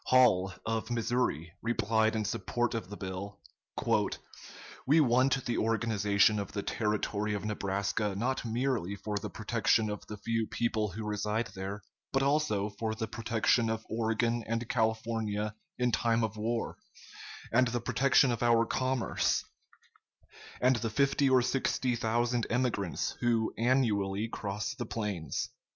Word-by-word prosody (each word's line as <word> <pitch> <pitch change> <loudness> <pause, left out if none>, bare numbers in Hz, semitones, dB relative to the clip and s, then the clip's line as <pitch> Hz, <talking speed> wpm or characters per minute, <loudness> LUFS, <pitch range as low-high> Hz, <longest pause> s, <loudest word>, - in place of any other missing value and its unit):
Hall, 110 -8 +5
of 115 0 -2
Missouri, 115 - -1
replied 110 -1 +1
in 110 -1 0
support 120 +5 -1
of 115 -5 -4
the 105 - -7
bill: 95 +1 -6 1.5
"We 150 +4 +6
want 130 -1 +3
the 120 - 0
organization 105 -2 +2
of 100 - -5
the 100 -1 -2
Territory 105 -1 -1
of 100 0 -4
Nebraska 100 0 -1
not 125 +6 -1
merely 115 -4 -1
for 105 +1 -3
the 105 +1 -5
protection 110 0 +1
of 105 - -7
the 105 - -6
few 115 +1 -1
people 110 -2 0
who 105 +4 -6
reside 105 +2 -1
there, 95 +2 -5 0.3
but 135 0 +2
also 135 -8 +1
for 110 -1 -1
the 110 0 -3
protection 115 +1 +1
of 110 0 -3
Oregon 115 +1 0
and 115 +1 -2
California 110 -2 -1 0.2
in 125 -1 +1
time 115 +1 +2
of 110 -1 -2
war, 115 +2 -2 0.7
and 125 +2 +4
the 120 +1 -1
protection 130 +2 +3
of 115 - -2
our 115 -1 +4
commerce 130 +1 0 1.1
and 125 0 +4
the 115 -1 -2
fifty 140 +3 +2
or 130 -1 +5
sixty 125 -1 0
thousand 120 +1 0
emigrants 115 -7 0
who 115 -2 +1
annually 110 -5 +1
cross 105 +3 -3
the 125 -5 -5
plains." 105 -9 -3
115 Hz, 140 wpm, -31 LUFS, 105-120 Hz, 1.5 s, We